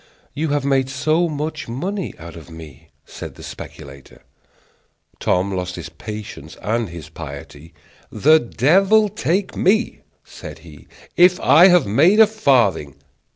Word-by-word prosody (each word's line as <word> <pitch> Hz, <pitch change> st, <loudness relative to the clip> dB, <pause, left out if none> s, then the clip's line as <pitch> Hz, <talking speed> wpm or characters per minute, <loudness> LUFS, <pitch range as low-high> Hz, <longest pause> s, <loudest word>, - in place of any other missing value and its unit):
"You 155 Hz, +4 st, -2 dB
have 145 Hz, -1 st, -1 dB
made 135 Hz, -1 st, +1 dB
so 155 Hz, +6 st, 0 dB
much 155 Hz, 0 st, -5 dB
money 185 Hz, -, -4 dB
out 85 Hz, 0 st, -11 dB
of 85 Hz, 0 st, -12 dB
me," 80 Hz, -5 st, -13 dB, 0.2 s
said -, -, -10 dB
the -, -, -13 dB
speculator. 70 Hz, -3 st, -11 dB, 1.0 s
Tom 95 Hz, +2 st, 0 dB
lost 90 Hz, -1 st, -4 dB
his 85 Hz, -2 st, -8 dB
patience 105 Hz, +2 st, -9 dB
and 115 Hz, -1 st, -1 dB
his 85 Hz, -3 st, -10 dB
piety. 80 Hz, +3 st, -11 dB, 0.4 s
"The 155 Hz, +3 st, +4 dB
devil 195 Hz, -, +2 dB
take 190 Hz, -1 st, -2 dB
me," 220 Hz, +5 st, +1 dB, 0.2 s
said -, -, -11 dB
he, -, -, -15 dB, 0.3 s
"if 180 Hz, +1 st, +5 dB
I 170 Hz, +5 st, +6 dB
have 180 Hz, -2 st, +4 dB
made 155 Hz, -, +3 dB
a 220 Hz, -, +9 dB
farthing!" 120 Hz, -, +1 dB
135 Hz, 140 wpm, -19 LUFS, -, 1.0 s, a